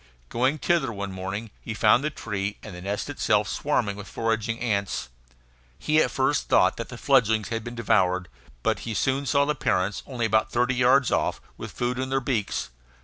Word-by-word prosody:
Going 130 Hz, +5 st, +1 dB
thither 155 Hz, -5 st, +1 dB
one 100 Hz, -2 st, -5 dB
morning, 95 Hz, +4 st, -5 dB
he 110 Hz, -, -5 dB
found 110 Hz, +4 st, +4 dB
the 150 Hz, -, +1 dB
tree, 105 Hz, -7 st, -4 dB
and 110 Hz, -, -8 dB
the 90 Hz, -, -8 dB
nest 100 Hz, +2 st, -3 dB
itself, -, -, +1 dB
swarming 100 Hz, -1 st, 0 dB
with 105 Hz, 0 st, -9 dB
foraging 115 Hz, 0 st, -1 dB
ants. 100 Hz, -, -1 dB, 0.7 s
He 155 Hz, +1 st, +2 dB
at -, -, +2 dB
first 135 Hz, +2 st, 0 dB
thought -, -, +4 dB
that -, -, -5 dB
the -, -, -8 dB
fledglings 110 Hz, -6 st, +3 dB
had 115 Hz, -1 st, -3 dB
been 120 Hz, +1 st, -7 dB
devoured, 95 Hz, -5 st, +2 dB, 0.4 s
but -, -, +1 dB
he 110 Hz, -, -5 dB
soon 135 Hz, +5 st, 0 dB
saw 140 Hz, +2 st, +3 dB
the 150 Hz, -, +1 dB
parents, 100 Hz, -8 st, 0 dB
only 125 Hz, -4 st, -2 dB
about 110 Hz, 0 st, +2 dB
thirty 125 Hz, +2 st, +2 dB
yards 125 Hz, +2 st, +4 dB
off, -, -, 0 dB, 0.2 s
with -, -, -7 dB
food 125 Hz, +1 st, -2 dB
in 130 Hz, 0 st, -2 dB
their 135 Hz, 0 st, +1 dB
beaks. 115 Hz, -, -2 dB
115 Hz, 195 wpm, -25 LUFS, 100-130 Hz, 0.7 s, found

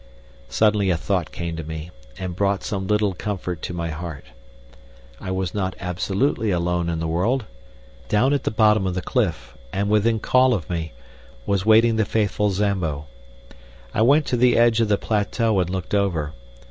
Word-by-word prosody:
Suddenly 105 Hz, +2 st, +2 dB
a 85 Hz, -, +2 dB
thought 90 Hz, +1 st, -1 dB
came 85 Hz, -1 st, -4 dB
to 80 Hz, -, -5 dB
me 80 Hz, +2 st, -7 dB, 0.3 s
and 90 Hz, +3 st, -5 dB
brought 100 Hz, -1 st, 0 dB
some 95 Hz, -2 st, -3 dB
little 105 Hz, -1 st, +2 dB
comfort 90 Hz, -3 st, -4 dB
to -, -, -4 dB
my 85 Hz, -2 st, -3 dB
heart. 75 Hz, -2 st, -7 dB, 0.9 s
I -, -, -6 dB
was 95 Hz, -1 st, -2 dB
not 95 Hz, -3 st, -2 dB
absolutely 100 Hz, +6 st, -1 dB
alone 85 Hz, -1 st, 0 dB
in 85 Hz, -, -1 dB
the 80 Hz, -, -2 dB
world. 105 Hz, +10 st, 0 dB, 0.6 s
Down 130 Hz, -, +3 dB
at 145 Hz, -, 0 dB
the -, -, 0 dB
bottom 105 Hz, -2 st, +3 dB
of 90 Hz, -, -2 dB
the 90 Hz, -, -3 dB
cliff, 105 Hz, -, -1 dB, 0.2 s
and 100 Hz, +1 st, -1 dB
within 110 Hz, +2 st, +3 dB
call 130 Hz, +2 st, +3 dB
of 90 Hz, -, -5 dB
me, 80 Hz, -2 st, -3 dB, 0.5 s
was 100 Hz, 0 st, 0 dB
waiting 110 Hz, +1 st, +5 dB
the 110 Hz, -, +2 dB
faithful 105 Hz, -1 st, 0 dB
Zambo. 90 Hz, -7 st, -1 dB, 0.9 s
I -, -, +1 dB
went 140 Hz, +6 st, +5 dB
to 125 Hz, -, 0 dB
the 125 Hz, +1 st, +4 dB
edge 115 Hz, -1 st, +4 dB
of 115 Hz, -, +2 dB
the 105 Hz, -1 st, +2 dB
plateau 110 Hz, 0 st, 0 dB
and 90 Hz, -1 st, 0 dB
looked 95 Hz, 0 st, -4 dB
over. 85 Hz, -7 st, 0 dB
100 Hz, 180 wpm, -23 LUFS, 85-110 Hz, 0.9 s, waiting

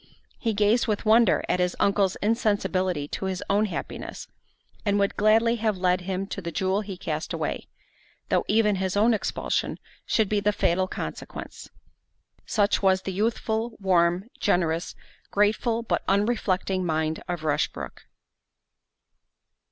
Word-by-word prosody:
He 225 Hz, -3 st, -1 dB
gazed 210 Hz, +3 st, +3 dB
with 215 Hz, 0 st, -1 dB
wonder 220 Hz, -1 st, +5 dB
at 180 Hz, -, +1 dB
his 180 Hz, 0 st, +1 dB
uncle's 200 Hz, -2 st, +2 dB
insensibility 200 Hz, -7 st, 0 dB
to -, -, -4 dB
his 190 Hz, -1 st, -3 dB
own 205 Hz, +2 st, +3 dB
happiness, 200 Hz, -, -6 dB, 0.6 s
and 205 Hz, -1 st, +1 dB
would 200 Hz, 0 st, +1 dB
gladly 225 Hz, +3 st, +4 dB
have 215 Hz, -3 st, 0 dB
led 180 Hz, 0 st, +2 dB
him 190 Hz, +1 st, -3 dB
to 195 Hz, -, -6 dB
the 170 Hz, -2 st, -5 dB
jewel 190 Hz, +4 st, 0 dB
he 195 Hz, -3 st, -7 dB
cast 155 Hz, -2 st, -4 dB
away, -, -, -3 dB, 0.6 s
though -, -, +2 dB
even 210 Hz, -2 st, +3 dB
his 190 Hz, +1 st, -1 dB
own 225 Hz, +3 st, +4 dB
expulsion 215 Hz, -, -1 dB, 0.3 s
should 220 Hz, -2 st, +2 dB
be 210 Hz, +1 st, +1 dB
the 210 Hz, +1 st, +2 dB
fatal 185 Hz, -1 st, +1 dB
consequence. -, -, -7 dB, 0.8 s
Such 205 Hz, -2 st, +2 dB
was 190 Hz, -1 st, +3 dB
the 190 Hz, -, -4 dB
youthful, 225 Hz, +2 st, -1 dB
warm, 180 Hz, 0 st, +2 dB
generous, 170 Hz, -4 st, 0 dB, 0.3 s
grateful, 220 Hz, +3 st, +1 dB
but -, -, -1 dB
unreflecting 195 Hz, -2 st, +1 dB
mind 160 Hz, -2 st, -1 dB
of 175 Hz, -3 st, -4 dB
Rushbrook. 155 Hz, -2 st, -2 dB
200 Hz, 140 wpm, -26 LUFS, 185-215 Hz, 0.8 s, wonder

